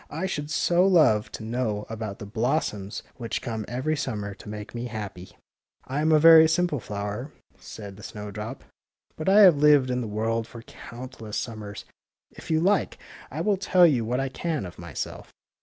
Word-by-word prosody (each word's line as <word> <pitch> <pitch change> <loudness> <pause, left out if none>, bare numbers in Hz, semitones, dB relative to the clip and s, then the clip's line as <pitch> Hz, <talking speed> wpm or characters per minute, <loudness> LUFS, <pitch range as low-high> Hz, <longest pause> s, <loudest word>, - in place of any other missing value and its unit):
I 160 +5 -3
should 150 -6 -3
so 175 +3 +2
love 145 - +4
to - - -6
know 110 -2 -2
about 110 -3 -5
the - - -8
blossoms 110 -2 -2
which 115 -2 -3
come 110 -3 -4
every 130 +7 -1
summer 105 -8 -3
to 100 - -12
make 105 0 -7
me 120 0 -4
happy. 105 -6 -7 0.2
'' - - -68
I 135 +3 -2
am 160 +1 +2
a 155 - +7
very 160 +1 +8
simple 165 -3 +1
flower," 105 +6 -5 0.3
said 100 -3 -10
the - - -12
snow 105 0 -7
drop, 105 +2 -7
^' - - -25 0.5
but 155 +4 -2
I 205 +2 +7
have 180 -7 +8
lived 145 -3 +5
in 125 0 -1
the 115 - -4
world 110 +2 -1
for 115 -1 -11
coimt 125 +2 -11
less 105 -2 -5
summers. 105 -3 -6 0.5
If - - -13
you 160 -1 +3
like, 195 +5 +1 0.3
I - - -4
will 205 -2 +2
tell 185 -2 +5
you 135 -8 +3
what 120 +3 -1
I 135 0 -1
can 155 - -3
of 90 - -10
myself." 85 -4 -6
120 Hz, 200 wpm, -26 LUFS, 105-155 Hz, 0.5 s, very